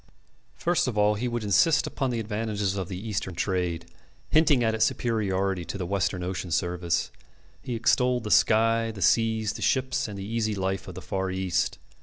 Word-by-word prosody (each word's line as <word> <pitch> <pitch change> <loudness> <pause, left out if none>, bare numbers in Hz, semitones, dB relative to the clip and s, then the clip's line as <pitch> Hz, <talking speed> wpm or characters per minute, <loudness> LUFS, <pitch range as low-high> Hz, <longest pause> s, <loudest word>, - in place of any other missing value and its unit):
First 175 -4 +1
of 120 -4 -2
all 105 0 +4
he 110 +4 -2
would 120 -2 -2
insist 105 +10 +3
upon 135 - -2
the 120 -2 -1
advantages 105 -2 -2
of 95 -3 -3
the 95 -2 -5
Eastern 100 -3 -4
trade, 85 -1 -1 0.5
hinting 150 -5 +4
at 110 -1 +2
its 110 - +2
superiority 95 -5 0
to - - -5
the 90 - -3
Western 95 -1 -1
ocean 95 0 -4
service. 85 0 -1 0.5
He 125 - -4
extolled 125 +1 +2
the 105 - -4
sky, 115 +1 +4
the 105 -4 -4
seas, 110 -2 +2
the - - -8
ships, 130 -2 +1
and 105 -2 -7
the 95 - -5
easy 110 0 -1
life 95 -1 -2
of - - -8
the - - -8
Far 95 0 -2
East. 95 -1 -1
105 Hz, 190 wpm, -26 LUFS, 95-115 Hz, 0.5 s, all